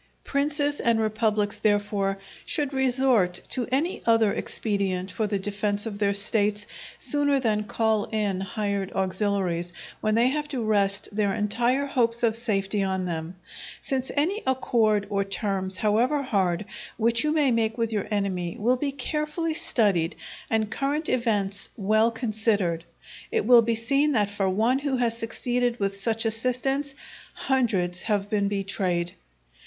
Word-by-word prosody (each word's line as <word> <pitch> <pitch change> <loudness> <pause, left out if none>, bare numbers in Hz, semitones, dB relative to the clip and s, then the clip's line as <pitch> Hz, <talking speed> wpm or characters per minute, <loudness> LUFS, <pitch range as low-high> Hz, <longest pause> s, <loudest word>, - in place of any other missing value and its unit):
Princes 290 +1 0
and 230 -1 +2
republics, 215 -1 0
therefore, 205 -2 +1 0.3
should 290 -2 -1
resort 255 -8 +2
to 250 -2 -2
any 305 +8 0
other 225 -3 +4
expedient 195 -3 -1
for 215 +2 -1
the 205 -1 -1
defence 205 +1 -1
of 205 -3 -5
their 200 -1 +2
States 205 0 +2 0.3
sooner 285 -1 +3
than 215 -4 +1
call 220 -2 +1
in 205 -4 -1
hired 200 0 -2
auxiliaries, 185 -2 -1 0.3
when 215 0 0
they 235 +2 +4
have 295 +2 -2
to 265 -5 -3
rest 200 -2 +1
their 205 -2 +1
entire 240 +6 +1
hopes 235 -4 0
of 225 -2 +3
safety 210 -3 0
on 190 -1 -1
them; 165 0 -4 0.4
since 265 -2 -1
any 355 +9 +1
accord 225 -5 +2
or 200 -1 +1
terms, 195 -2 -3
however 240 +7 +2
hard, 195 -6 0 0.3
which 230 +1 +2
you 305 - +1
may 300 -4 +3
make 225 -1 0
with 230 -1 -1
your 210 -2 -1
enemy, 190 -5 -2
will 245 +4 +2
be 280 +2 -2
carefully 300 +4 -2
studied 200 - +1 0.3
and 220 -1 0
current 290 +5 -1
events 205 -6 0
well 215 +2 +3
considered, 215 -7 0 0.5
it 450 -1 0
will 245 -2 +8
be 230 0 0
seen 275 +6 +2
that 205 -4 +1
for 195 -2 0
one 225 +7 +2
who 280 -2 -1
has 235 -2 0
succeeded 240 +1 -1
with 195 0 -2
such 225 +2 0
assistance, 255 +5 -1 0.4
hundreds 200 -10 0
have 205 -2 -1
been 205 -2 +1
betrayed. 190 -3 -1
220 Hz, 150 wpm, -25 LUFS, 200-250 Hz, 0.5 s, will